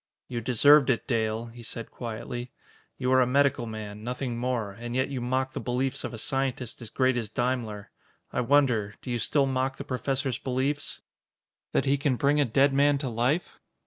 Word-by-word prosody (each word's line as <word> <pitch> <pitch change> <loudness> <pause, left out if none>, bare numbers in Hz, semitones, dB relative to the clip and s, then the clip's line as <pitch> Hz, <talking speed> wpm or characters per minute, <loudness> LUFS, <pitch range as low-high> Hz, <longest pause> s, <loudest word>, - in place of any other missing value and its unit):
"You 120 -2 -3
deserved 135 +5 +6
it, 120 - +1
Dale," 110 -2 0
he 120 0 -11
said 115 0 -7
quietly. 120 +1 -5 0.5
"You 125 - 0
are 130 0 +6
a 125 - +3
medical 135 -2 +2
man, 105 -1 -7
nothing 125 +1 -3
more, 120 -4 -1
and 120 +4 -6
yet 130 +1 +1
you 135 -3 -3
mock 130 +2 -1
the - - -3
beliefs 125 +1 -1
of - - -3
a 115 - -7
scientist 130 -1 -2
as 115 - -7
great 130 0 +2
as 115 -3 -3
Daimler. 115 -4 -2 0.4
I - - +1
wonder 120 -6 +2
do 125 - -4
you 120 - 0
still 140 +5 +2
mock 130 0 -1
the - - -5
Professor's 135 -1 -1
beliefs?" 135 +3 -2 0.7
"That - - +1
he 140 +1 +3
can 140 -2 +1
bring 145 +3 +3
a - - +3
dead 135 +4 +3
man 140 +1 +4
to 135 -2 -3
life?" 125 +9 0
125 Hz, 195 wpm, -27 LUFS, 115-135 Hz, 0.7 s, deserved